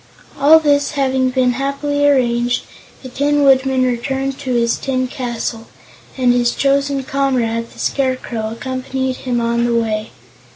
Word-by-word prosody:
All 305 +3 +7
this 285 -2 +1
having 265 -2 +1
been 255 -1 +2
happily 280 +2 -1
arranged, 245 -3 +1 0.4
the 260 - -8
Tin 290 +3 +1
Woodman 265 -1 +3
returned 265 +2 -2
to 260 -3 -2
his 235 -1 +1
tin 255 -1 -1
castle, 235 -3 -4 0.5
and 250 -2 +3
his 240 -1 +1
chosen 275 0 +1
comrade, 250 -4 -1
the - - -18
Scarecrow, 255 -5 -2
accompanied 260 +1 -3
him 245 -2 -2
on 235 0 0
the 240 0 +1
way. 220 -2 -1
260 Hz, 140 wpm, -17 LUFS, 240-275 Hz, 0.5 s, All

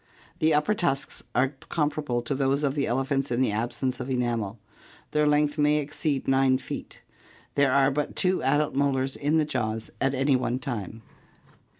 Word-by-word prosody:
The 160 - +3
upper 150 +8 +2
tusks 145 -8 -1
are 130 +1 +3 0.2
comparable 150 -6 -1
to 130 - -2
those 135 +1 +1
of 140 -2 +1
the 140 -1 0
elephants 135 +3 0
in 120 0 0
the 130 -4 +2
absence 120 +4 -2
of 130 +1 -5
enamel. 120 -5 -1 0.5
Their 150 0 +2
length 150 0 +2
may 150 0 +4
exceed 145 -1 -2
9 135 -1 +4
feet. 130 - -8 0.5
There 140 -2 +3
are 135 +1 +4
but 145 +1 -2
two 185 0 +2
adult 145 +3 +1
molars 135 -1 0
in 150 +3 +1
the 155 - +3
jaws 115 -5 -3
at 135 0 +2
any 135 +1 +3
one 125 -1 0
time. 115 -5 -5
135 Hz, 175 wpm, -26 LUFS, 130-145 Hz, 0.5 s, may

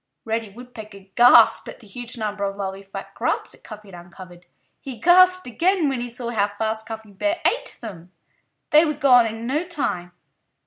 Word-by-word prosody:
Reddy 225 -1 -3
Woodpecker 220 -2 -12
gasped 245 +1 +6
at - - -10
the 230 - -17
huge 240 +4 -7
number 210 -2 -4
of 195 0 -2
lovely 195 -1 -5
fat 195 0 -10
grubs - - -2
that - - -16
Cuffy 215 -2 -11
had 175 -1 -11
uncovered. 175 0 -14 0.3
He 260 -3 -8
gasped 365 +5 +5
again 330 - +1
when 260 -3 -3
he 245 - -5
saw 240 0 -6
how 205 -3 +1
fast 220 0 -2
Cuffy 220 -2 -8
Bear 310 - -2
ate - - -1
them. 180 -6 -10 0.6
They 305 +1 +7
were 305 -2 -1
gone 250 -4 +5
in 225 +1 -6
no 290 +7 -1
time. 220 - -3
225 Hz, 185 wpm, -22 LUFS, 200-265 Hz, 0.6 s, They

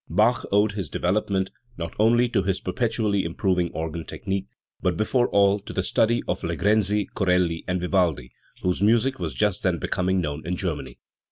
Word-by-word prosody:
Bach 110 +7 +2
owed 105 +1 +3
his 100 -2 -5
development 95 +1 0 0.3
not 85 -1 -5
only 120 +3 +4
to 105 - +1
his 95 0 -1
perpetually 105 -1 0
improving 90 +1 0
organ 80 +1 -4
technique, 95 +3 -4 0.3
but 90 -2 0
before 120 +4 +2
all 100 0 +4
to - - -9
the - - -1
study 115 +1 +2
of - - -1
Legrenzi, 105 +1 +1
CoreUi 90 -4 +1
and 90 0 0
Vivaldi, 90 -8 0 0.3
whose 90 0 0
music 115 +5 +3
was 80 -7 -3
just - - +1
then - - +1
becoming 95 +1 0
known 75 -3 -3
in 90 +1 -2
Germany. 85 -5 -4
95 Hz, 170 wpm, -24 LUFS, 85-105 Hz, 0.3 s, only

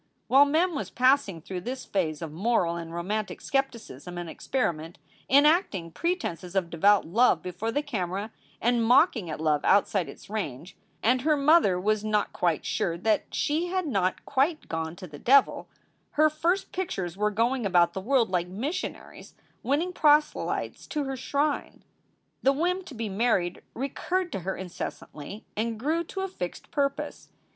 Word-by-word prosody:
While 275 +2 +7
Mem 330 +5 +2
was 280 - -4
passing 255 - +2
through 180 +2 -6
this 255 +7 -5
phase 165 -5 -1
of 160 - -5
moral 180 -1 +1
and 165 -1 -6
romantic 200 +5 -3
skepticism 230 - -3
and 175 -1 -5
experiment, 165 -5 -2 0.3
enacting 280 - +3
pretenses 190 - -3
of 180 -3 0
devout 200 +4 +4
love 195 0 +3
before 185 +5 -3
the 290 +4 -1
camera 200 -5 -3 0.3
and 240 0 +2
mocking 225 - +4
at 155 - -5
love 155 -2 +1
outside 195 -4 +3
its - - -12
range, 185 -4 -5 0.3
and 250 +2 +3
her 305 +2 +2
mother 280 - +4
was 215 +2 +1
not 210 -1 0
quite 170 -4 0
sure 170 -1 -1
that 215 +4 +1
she 315 +4 0
had 370 0 -1
not 195 - -1
quite 285 +4 0
gone 160 0 -3
to 185 +1 -9
the 150 -4 -11
devil, 275 +2 +3 0.4
her 310 +1 +4
first 345 +5 0
pictures 190 - -3
were 210 +2 +1
going 235 +4 0
about 175 -3 +3
the 190 - -4
world 235 -1 +2
like 175 -1 0
missionaries 270 - -5 0.3
winning 320 +7 0
proselytes 300 -2 +1
to 300 -2 -2
her 270 -1 -3
shrine. 285 +3 -2 0.6
The 270 - +4
whim 355 +6 0
to 285 - -10
be 225 -1 -3
married 195 -4 0
recurred 345 +7 -2
to 195 - -3
her 190 +2 -4
incessantly 180 0 -7
and 225 +1 -2
grew 315 +7 0
to 385 - -5
a 385 - -1
fixed 180 - -7
purpose. 280 -1 -2
220 Hz, 165 wpm, -27 LUFS, 180-285 Hz, 0.6 s, While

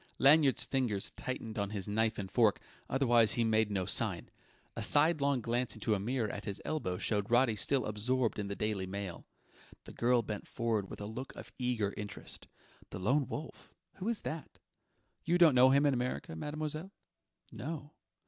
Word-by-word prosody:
Lanyard's 140 0 +5
fingers 120 -7 -1
tightened 115 -4 -5
on 100 -1 -1
his 100 -2 -5
knife 110 +2 +1
and 95 -2 -5
fork; 110 -3 +3 0.3
otherwise 120 -4 +4
he 120 - +1
made 110 -1 +2
no 95 -3 -1
sign. - - 0 0.5
A - - -4
sidelong 145 -3 +3
glance 120 -1 -1
into 110 0 0
a 105 - 0
mirror 115 +2 -1
at 100 0 -6
his 100 -1 -4
elbow 95 -13 -2
showed 105 0 -1
Roddy 120 -1 +4
still 130 +4 +1
absorbed 115 +3 0
in 100 - -2
the 100 - -4
Daily 105 -3 -2
Mail. 95 -2 -5 0.6
The - - -11
girl 120 0 +2
bent 105 -2 -5
forward 115 -5 -1
with - - -8
a - - -4
look 120 +6 -6
of - - -10
eager 120 -5 0
interest. 105 -1 -7 0.4
"The - - -6
Lone 130 +9 +1
Wolf? 145 +4 -8 0.2
Who 195 +4 -2
is 235 - -1
that?" 155 -3 -6 0.7
"You 170 +1 +2
don't 170 -4 +7
know 130 +1 +7
him 140 +2 +4
in 145 - +4
America, 125 - -3
mademoiselle?" 155 - -4 0.6
"No...." 150 0 -6
120 Hz, 175 wpm, -33 LUFS, 105-135 Hz, 0.7 s, don't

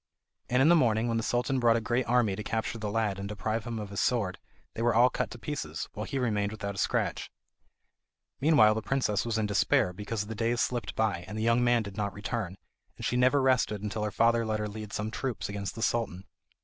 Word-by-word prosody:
And 125 +2 +3
in - - +5
the 175 - +7
morning, 115 -6 +3
when 115 -1 0
the - - 0
Sultan 125 +3 0
brought 120 -2 +4
a - - +2
great 120 +3 -1
army 120 -5 +2
to 105 - -5
capture 115 +1 -3
the 105 -1 -3
lad 105 -2 0
and 100 0 -5
deprive 110 +2 -2
him 120 -1 -4
of 105 -2 -6
his 100 - -2
sword, 105 -7 0 0.3
they - - -5
were 120 0 +2
all 125 +2 +6
cut - - -2
to - - -9
pieces, 90 - -4
while 105 +1 -5
he 140 - -3
remained 105 -5 0
without 100 -2 -4
a 95 - -6
scratch. - - -1 1.1
Meanwhile 140 -8 +5
the 110 - -2
princess 120 -4 0
was 115 -1 0
in 110 - +1
despair 100 -3 +2
because 105 +2 -4
the 110 - -6
days 115 +2 0
slipped 120 -2 -1
by, 105 -6 0
and 105 - -6
the 110 - -2
young 115 +1 +3
man 120 -1 +3
did 100 -1 -9
not 100 -2 -2
return, 105 -2 -4 0.4
and - - -5
she - - 0
never 130 +2 +4
rested 125 -6 +2
until 105 +1 -3
her 105 - 0
father 115 +2 +3
let 110 -1 -1
her 105 - -2
lead 105 0 -7
some 105 +1 -3
troops 125 -2 -3
against 100 -1 -4
the 115 - -3
Sultan. 110 -6 -1
110 Hz, 240 wpm, -29 LUFS, 105-120 Hz, 1.1 s, the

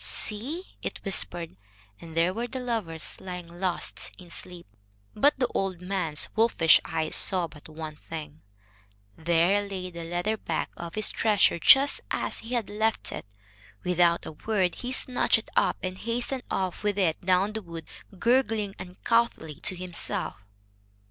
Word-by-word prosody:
"See," 270 - -2 0.2
it - - -4
whispered, 175 - +3 0.4
and 165 -1 -9
there 170 +2 +3
were 235 +4 -2
the 260 +2 -5
lovers, 220 -10 -3
lying 180 -2 -6
lost 175 +1 -3
in 175 -2 -13
sleep. 180 0 -8 0.5
But 280 +8 +4
the 255 - +2
old 190 -3 -1
man's 180 -5 +1
wolfish 220 -8 +5
eyes 155 -1 -1
saw 185 -3 +1
but 150 0 -14
one 155 -1 -7
thing. 155 -1 -8 0.7
There 170 +4 +3
lay 190 -2 -5
the 170 -1 -7
leather 175 +6 -1
bag 165 -6 -2
of 170 -1 -7
his 215 -1 +2
treasure 210 -5 +3
just 275 - +6
as - - -2
he 235 +3 -4
had 230 -4 0
left 220 +1 0
it. - - -6 0.6
Without 175 -1 +3
a - - -5
word, 185 +2 0
he 250 - -5
snatched 255 -2 +2
it 225 - -8
up - - +3
and 185 0 -3
hastened 240 +3 -2
off 185 -2 -1
with 205 -1 0
it 180 -5 +1
down 185 +3 +3
the 220 - -3
wood, 170 -3 -8 0.3
gurgling 225 -3 +2
uncouthly 185 -3 0
to 185 - +1
himself. 180 +2 -2
185 Hz, 155 wpm, -27 LUFS, 170-220 Hz, 0.7 s, just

